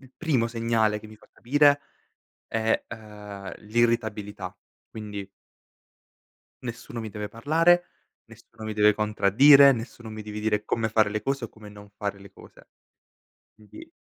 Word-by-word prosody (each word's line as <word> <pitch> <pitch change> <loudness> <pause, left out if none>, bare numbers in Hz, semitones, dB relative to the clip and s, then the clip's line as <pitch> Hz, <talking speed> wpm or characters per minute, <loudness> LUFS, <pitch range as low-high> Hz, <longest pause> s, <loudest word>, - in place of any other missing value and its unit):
il 130 -1 -18
primo 135 -8 +1
segnale 115 -2 +1
che 110 - -12
mi 110 0 -14
fa - - -23
capire 145 +3 +3 0.7
è, 115 0 0
ehm, 105 -3 -9
l'irritabilità, 105 -4 -1 0.3
quindi 105 -2 -7 1.3
nessuno 120 -1 -7
mi 110 -2 -6
deve 105 0 -5
parlare, 165 +9 +3 0.4
nessuno 110 -1 -14
mi 110 - -3
deve 105 0 +4
contraddire, 115 +7 +6
nessuno 120 -1 -7
mi 110 0 -7
deve 105 0 -7
dire 105 -1 0
come 115 -1 -1
fare 110 -1 +2
le 105 0 -3
cose 135 -2 -2
o - - -6
come 110 -1 -14
non 105 0 -14
fare 100 -1 -5
le 100 0 -14
cose. - - -17 0.9
Quindi 110 - -14
110 Hz, 145 wpm, -26 LUFS, 105-120 Hz, 1.3 s, contraddire